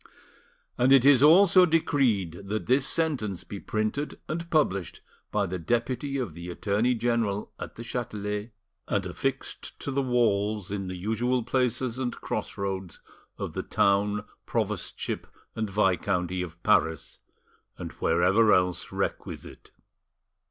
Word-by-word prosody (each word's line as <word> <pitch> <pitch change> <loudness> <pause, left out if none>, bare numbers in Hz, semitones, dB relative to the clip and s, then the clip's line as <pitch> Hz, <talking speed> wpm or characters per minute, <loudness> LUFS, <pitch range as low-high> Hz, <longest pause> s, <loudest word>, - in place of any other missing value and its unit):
And 125 +2 +4
it 135 -2 +7
is 140 -3 +7
also 180 +4 +7
decreed 110 - +1
that 105 +2 -2
this 130 +2 +3
sentence 130 - 0
be 100 - -7
printed 110 +10 -2
and 170 +2 -4
published 100 - 0 0.3
by 105 -1 +1
the 90 0 -4
deputy 120 - -1
of 120 - -3
the 85 +2 -8
Attorney 105 +7 +1
General 115 -3 0
at - - -7
the 115 - -7
Chatelet, 105 -2 -4 0.4
and 100 -2 0
affixed 135 +9 -4
to 140 - -4
the 140 +1 +1
walls 105 -5 +1
in 100 -2 -3
the 90 - -5
usual 115 +6 0
places 125 0 0
and 125 -2 -2
cross - - -4
roads 95 -3 -4 0.4
of - - -5
the - - -2
town, 105 +1 +1 0.2
provostship - - -2 0.3
and 110 -2 -2
viscounty 95 -2 +1
of 85 -1 -8
Paris, 80 0 +1 0.6
and - - -6
wherever 95 +7 +3
else 90 -1 +1
requisite. - - -5
110 Hz, 135 wpm, -27 LUFS, 95-130 Hz, 0.6 s, it